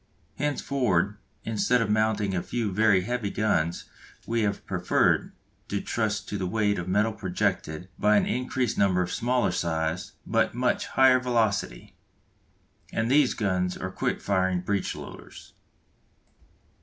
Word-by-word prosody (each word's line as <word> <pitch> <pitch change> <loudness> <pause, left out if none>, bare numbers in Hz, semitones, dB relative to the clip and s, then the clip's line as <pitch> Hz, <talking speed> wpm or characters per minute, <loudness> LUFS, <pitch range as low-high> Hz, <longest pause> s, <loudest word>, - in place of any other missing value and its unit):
Henceforward 125 -9 0 0.3
instead 115 +3 +1
of 115 - 0
mounting 105 -2 +1
a 90 - 0
few 115 -1 -2
very 105 -1 +4
heavy 115 +1 -2
guns 85 -6 0 0.4
we 115 0 0
have 100 -1 -1
preferred 90 -2 +1 0.4
to 100 - -2
trust 110 -1 -2
to 100 - -3
the 95 - -1
weight 105 0 +1
of 90 - -5
metal 105 +4 +2
projected 90 -4 -2
by 105 +1 +4
an - - +3
increased 125 -1 -1
number 95 -2 +3
of 90 - -5
smaller 125 -3 +1
size, 80 0 -2
but - - +1
much - - 0
higher 130 -1 +5
velocity. 110 - -1 1.0
And 115 +2 -1
these 140 -2 +4
guns 90 -4 -1
are 90 - -4
the - - -21
quick - - -1
firing 95 -2 +1
breech 100 +1 -1
loaders. - - -11
105 Hz, 145 wpm, -26 LUFS, 90-115 Hz, 1.0 s, higher